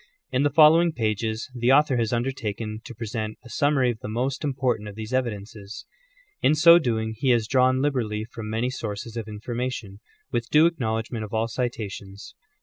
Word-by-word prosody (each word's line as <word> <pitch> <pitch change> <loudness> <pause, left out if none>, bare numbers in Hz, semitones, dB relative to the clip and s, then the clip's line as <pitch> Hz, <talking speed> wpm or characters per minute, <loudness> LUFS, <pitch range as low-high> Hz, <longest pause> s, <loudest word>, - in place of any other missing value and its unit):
In 130 - +1
the 145 - +3
following 160 +3 +6
pages 110 0 -2
the 120 0 +1
author 145 -1 +4
has 115 -2 0
undertaken 115 -3 -3
to 120 - -9
present 110 -1 -4
a - - -11
summary 140 -4 +2
of 110 - -8
the - - -7
most 125 +6 -2
important 130 -7 -1
of 100 - -11
these 110 +2 -7
evidences. 105 -4 -4 0.6
In 155 - +4
so 170 +2 +8
doing 110 -6 -1
he 130 +4 -1
has 120 -3 +3
drawn 130 +1 +3
liberally 115 -7 -1
from 115 -2 -8
many 115 +3 -1
sources 110 -2 -5
of 115 -2 -4
information, 115 -1 -5 0.3
with 120 0 -2
due 155 +2 +6
acknowledgment 115 -7 -1
of 110 +1 -6
all 110 +1 +1
citations. 105 -5 -5
120 Hz, 175 wpm, -25 LUFS, 110-130 Hz, 0.6 s, so